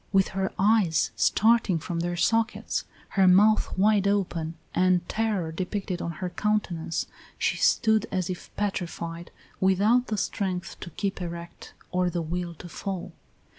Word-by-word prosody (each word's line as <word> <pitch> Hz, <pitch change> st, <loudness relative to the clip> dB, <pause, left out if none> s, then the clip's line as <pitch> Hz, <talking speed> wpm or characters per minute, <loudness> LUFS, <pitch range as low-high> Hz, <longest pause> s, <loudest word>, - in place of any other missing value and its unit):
With 195 Hz, -1 st, +3 dB
her 190 Hz, 0 st, -2 dB
eyes 190 Hz, -7 st, +3 dB
starting 220 Hz, -5 st, +3 dB
from 170 Hz, +1 st, -4 dB
their 175 Hz, +1 st, -1 dB
sockets, 225 Hz, +4 st, 0 dB, 0.2 s
her 190 Hz, -2 st, +3 dB
mouth 205 Hz, +4 st, +4 dB
wide 200 Hz, 0 st, +4 dB
open, 175 Hz, -5 st, -1 dB, 0.2 s
and 180 Hz, -1 st, +2 dB
terror 210 Hz, -7 st, -1 dB
depicted 185 Hz, +1 st, -3 dB
on 170 Hz, -, -3 dB
her 180 Hz, +3 st, -4 dB
countenance, 180 Hz, -5 st, -1 dB, 0.3 s
she -, -, 0 dB
stood 220 Hz, -2 st, +3 dB
as 185 Hz, -2 st, -1 dB
if 180 Hz, -1 st, -6 dB
petrified, 170 Hz, -4 st, -3 dB, 0.3 s
without 205 Hz, +6 st, +3 dB
the 215 Hz, -, -2 dB
strength 185 Hz, -3 st, -3 dB
to -, -, -7 dB
keep 195 Hz, +3 st, -3 dB
erect 170 Hz, -1 st, -7 dB, 0.2 s
or 180 Hz, 0 st, +1 dB
the 175 Hz, -1 st, -2 dB
will 170 Hz, +1 st, -3 dB
to 175 Hz, -, -10 dB
fall. 190 Hz, +2 st, -5 dB
185 Hz, 145 wpm, -27 LUFS, 170-205 Hz, 0.3 s, mouth